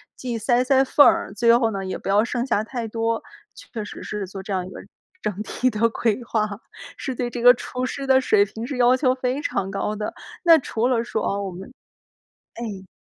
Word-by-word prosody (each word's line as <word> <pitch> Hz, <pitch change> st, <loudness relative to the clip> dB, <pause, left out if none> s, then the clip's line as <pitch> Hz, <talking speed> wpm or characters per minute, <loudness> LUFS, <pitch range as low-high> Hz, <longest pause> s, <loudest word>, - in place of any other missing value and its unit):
既 245 Hz, -3 st, -4 dB
塞 240 Hz, +3 st, +2 dB
塞 265 Hz, +1 st, +4 dB
缝 285 Hz, +2 st, +5 dB
儿， 335 Hz, -, +2 dB
最 230 Hz, +3 st, +4 dB
后 230 Hz, -2 st, +1 dB
呢， 195 Hz, -2 st, -4 dB
也 185 Hz, -, -3 dB
不 -, -, -6 dB
要 205 Hz, +2 st, +4 dB
剩 240 Hz, 0 st, -2 dB
下 215 Hz, -5 st, +1 dB
太 230 Hz, 0 st, -5 dB
多， 225 Hz, +1 st, -1 dB, 0.5 s
确 220 Hz, -, -3 dB
实 -, -, -9 dB
是 210 Hz, -2 st, -4 dB
做 195 Hz, +1 st, -8 dB
这 195 Hz, -, -4 dB
样 185 Hz, -1 st, -1 dB
一 -, -, -9 dB
个 -, -, -9 dB, 0.4 s
整 205 Hz, -1 st, -3 dB
体 255 Hz, +3 st, 0 dB
的 225 Hz, +2 st, +2 dB
规 230 Hz, +1 st, -1 dB
划， 220 Hz, -2 st, 0 dB, 0.5 s
是 265 Hz, -, -4 dB
对 245 Hz, 0 st, -2 dB
这 240 Hz, -, -5 dB
个 245 Hz, +1 st, +9 dB
厨 250 Hz, +1 st, -4 dB
师 275 Hz, +1 st, -5 dB
的 265 Hz, -1 st, +4 dB
水 210 Hz, -5 st, +4 dB
平 220 Hz, +3 st, -7 dB
是 275 Hz, -, -4 dB
要 245 Hz, +1 st, +5 dB
求 255 Hz, -1 st, +2 dB
非 255 Hz, +2 st, -2 dB
常 195 Hz, -, -2 dB
高 200 Hz, +2 st, -2 dB
的。 210 Hz, 0 st, -4 dB, 0.3 s
那 335 Hz, -2 st, +8 dB
除 240 Hz, -3 st, -1 dB
了 240 Hz, -3 st, +1 dB
说， 220 Hz, -2 st, -3 dB
哦， 200 Hz, 0 st, -1 dB
我 195 Hz, -, -4 dB
们 190 Hz, +8 st, -10 dB, 0.8 s
哎。 205 Hz, -5 st, -6 dB
230 Hz, 240 characters per minute, -23 LUFS, 210-255 Hz, 0.8 s, 个